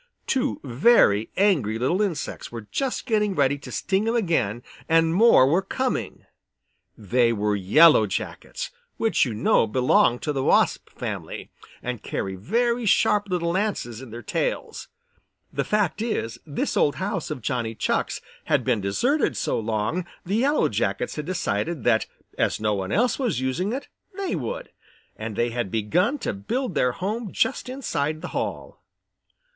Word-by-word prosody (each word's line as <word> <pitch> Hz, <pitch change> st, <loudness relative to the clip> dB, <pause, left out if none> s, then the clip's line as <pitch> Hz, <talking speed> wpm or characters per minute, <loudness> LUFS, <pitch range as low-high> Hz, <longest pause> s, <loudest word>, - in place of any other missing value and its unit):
Two 265 Hz, +1 st, 0 dB
very 120 Hz, -, +4 dB
angry 150 Hz, -, +2 dB
little 135 Hz, -, +1 dB
insects 190 Hz, -7 st, -3 dB
were 115 Hz, -3 st, -7 dB
just 270 Hz, -2 st, -2 dB
getting 210 Hz, -5 st, +1 dB
ready 140 Hz, -1 st, +2 dB
to -, -, -10 dB
sting 195 Hz, +3 st, 0 dB
him 230 Hz, -, +1 dB
again, 125 Hz, -, 0 dB, 0.3 s
and 165 Hz, 0 st, +4 dB
more 205 Hz, -, +6 dB
were 165 Hz, +8 st, +3 dB
coming. 255 Hz, +6 st, -3 dB, 0.7 s
They 115 Hz, +3 st, +2 dB
were 105 Hz, -1 st, 0 dB
Yellow 110 Hz, -, +6 dB
Jackets, -, -, -5 dB, 0.3 s
which 225 Hz, -8 st, +2 dB
you 120 Hz, -4 st, -4 dB
know 110 Hz, +1 st, +3 dB
belong 125 Hz, +1 st, +3 dB
to 150 Hz, -, -1 dB
the 135 Hz, -2 st, -1 dB
wasp -, -, +2 dB
family -, -, -6 dB, 0.3 s
and 125 Hz, -3 st, -4 dB
carry 95 Hz, -, -3 dB
very 235 Hz, -, 0 dB
sharp 205 Hz, 0 st, +3 dB
little 170 Hz, -2 st, 0 dB
lances 175 Hz, -, -2 dB
in 130 Hz, -, -10 dB
their 115 Hz, +2 st, -8 dB
tails. -, -, -3 dB, 0.7 s
The -, -, 0 dB
fact 210 Hz, -3 st, 0 dB
is, 220 Hz, -, -2 dB
this 145 Hz, -, -2 dB
old 145 Hz, -, +3 dB
house 190 Hz, -3 st, -3 dB
of 150 Hz, -7 st, -5 dB
Johnny 115 Hz, -3 st, -2 dB
Chuck's -, -, -1 dB, 0.2 s
had -, -, +2 dB
been 120 Hz, -4 st, +1 dB
deserted 245 Hz, -, +1 dB
so -, -, 0 dB
long 110 Hz, +11 st, -2 dB, 0.2 s
the 195 Hz, +5 st, 0 dB
Yellow 285 Hz, +5 st, +3 dB
Jackets 100 Hz, +1 st, -1 dB
had 150 Hz, 0 st, -5 dB
decided 165 Hz, -, -2 dB
that 110 Hz, -2 st, +2 dB, 0.3 s
as -, -, +1 dB
no 105 Hz, -1 st, +1 dB
one 95 Hz, -1 st, -3 dB
else 245 Hz, +5 st, +2 dB
was 235 Hz, -, 0 dB
using 130 Hz, +10 st, -1 dB
it, 270 Hz, +3 st, -4 dB, 0.3 s
they 390 Hz, -2 st, -1 dB
would, -, -, -5 dB, 0.4 s
and 110 Hz, -1 st, -6 dB
they 120 Hz, +2 st, 0 dB
had 120 Hz, -4 st, -2 dB
begun 115 Hz, -, +1 dB
to -, -, 0 dB
build 220 Hz, -, -3 dB
their 125 Hz, -4 st, +2 dB
home 210 Hz, -, -3 dB
just 260 Hz, -, 0 dB
inside 155 Hz, -, -2 dB
the -, -, -4 dB
hall. -, -, -4 dB
155 Hz, 160 wpm, -24 LUFS, -, 0.7 s, more